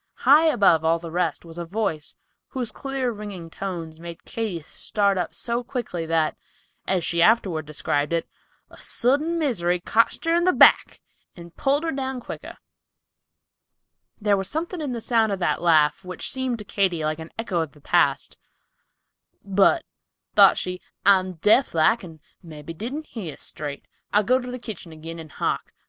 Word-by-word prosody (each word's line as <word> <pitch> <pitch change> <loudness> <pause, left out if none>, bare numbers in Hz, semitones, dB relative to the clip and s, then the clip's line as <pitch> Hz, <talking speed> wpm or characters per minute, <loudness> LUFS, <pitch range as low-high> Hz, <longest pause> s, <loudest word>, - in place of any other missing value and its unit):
High 295 +5 +7
above 200 - +4
all 165 +1 +3
the 165 0 -8
rest 175 -2 -1
was 165 +1 -9
a - - -2
voice, 165 -5 -3 0.3
whose 250 -4 -3
clear, 270 -2 -3
ringing 205 -6 -8
tones 165 -5 -6
made 170 0 -9
Katy 215 -7 -4
start 200 +5 -1
up 180 -3 -3
so 235 +1 -2
quickly 215 -10 -4
that, 165 -1 +1 0.5
as 185 -3 +1
she 170 0 +1
afterward 180 -7 +3
described 145 0 -1
it, 170 -1 0 0.4
"a - - -13
sudden 290 +8 +1
misery 180 - 0
cotched 230 - +1
her 330 - +2
in 345 +1 +3
the 365 +1 +4
back, - - +5 0.3
and 170 -1 -12
pulled 285 +2 +1
her 325 - -1
down 265 -1 -3
quicker." - - -8 1.6
There 205 -2 +3
was 195 -1 -2
something 335 +2 -3
in 290 -4 -3
the 235 -2 -4
sound 225 -2 +2
of - - -2
that 175 - 0
laugh, 160 +1 +3
which 180 0 -4
seemed 260 -2 -1
to 210 - -9
Katy 185 -6 0
like 155 +1 -1
an 160 0 -8
echo 220 -6 -1
of 160 -4 -5
the 150 - -18
past. 145 -4 +1 1.1
"But," 200 - +3 0.5
thought - - +7
she, 180 0 -3 0.2
"I'm 185 -2 +4
deaf 210 - +3
like 205 +9 +3
and 165 -3 -11 0.2
mebby 160 -1 -9
didn't 255 - -5
hear 185 - -7
straight. 145 -2 -7 0.3
I'll 210 +1 +3
go 255 +5 +3
to 250 -1 -7
the 250 - -5
kitchen 220 -8 -8
agin 165 +1 -8
and 160 -2 -10
hark." - - -3
190 Hz, 175 wpm, -24 LUFS, 165-240 Hz, 1.6 s, High